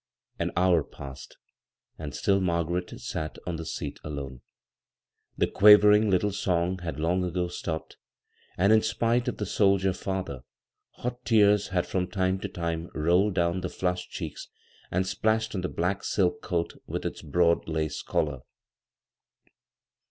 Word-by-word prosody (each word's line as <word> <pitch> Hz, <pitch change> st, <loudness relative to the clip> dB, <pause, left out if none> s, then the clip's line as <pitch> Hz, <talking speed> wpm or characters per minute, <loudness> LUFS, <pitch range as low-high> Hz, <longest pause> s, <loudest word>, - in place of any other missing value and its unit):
An -, -, -1 dB
hour 90 Hz, -3 st, +4 dB
passed, 70 Hz, -2 st, -11 dB, 0.6 s
and 75 Hz, -4 st, -6 dB
still 100 Hz, +7 st, +2 dB
Margaret 85 Hz, 0 st, 0 dB
sat 95 Hz, -12 st, -4 dB
on 85 Hz, -2 st, -3 dB
the 80 Hz, -, -6 dB
seat -, -, -5 dB
alone. 70 Hz, -4 st, -6 dB, 1.0 s
The -, -, +3 dB
quavering 105 Hz, +1 st, +7 dB
litde 100 Hz, +2 st, +2 dB
song 90 Hz, -2 st, 0 dB
had 85 Hz, -3 st, -5 dB
long 90 Hz, +4 st, +1 dB
ago 90 Hz, 0 st, -1 dB
stopped, 80 Hz, -2 st, -5 dB, 0.6 s
and 100 Hz, +4 st, +4 dB
in 110 Hz, -, +6 dB
spite 115 Hz, +2 st, +1 dB
of -, -, -2 dB
the 105 Hz, -, -2 dB
soldier 95 Hz, -1 st, +2 dB
father, 95 Hz, -9 st, -4 dB, 0.5 s
hot 125 Hz, 0 st, -5 dB
tears 105 Hz, -3 st, +4 dB
had 90 Hz, -3 st, 0 dB
from 90 Hz, -1 st, -1 dB
time 95 Hz, 0 st, 0 dB
to 100 Hz, -, -4 dB
time 85 Hz, -2 st, -4 dB
rolled 90 Hz, +6 st, +2 dB
down 85 Hz, +1 st, +1 dB
the 90 Hz, -, -3 dB
flushed 90 Hz, 0 st, -2 dB
cheeks -, -, -6 dB, 0.4 s
and 90 Hz, +1 st, 0 dB
splashed 110 Hz, +3 st, 0 dB
on 95 Hz, -, -2 dB
the 90 Hz, -, -2 dB
black 90 Hz, +3 st, -1 dB
silk 90 Hz, -3 st, +1 dB
coat 85 Hz, -2 st, -2 dB
with -, -, -4 dB
its -, -, -4 dB
broad 85 Hz, +2 st, +2 dB
lace 80 Hz, -2 st, -2 dB
collar. 75 Hz, -4 st, -1 dB
90 Hz, 150 wpm, -27 LUFS, 85-100 Hz, 1.0 s, quavering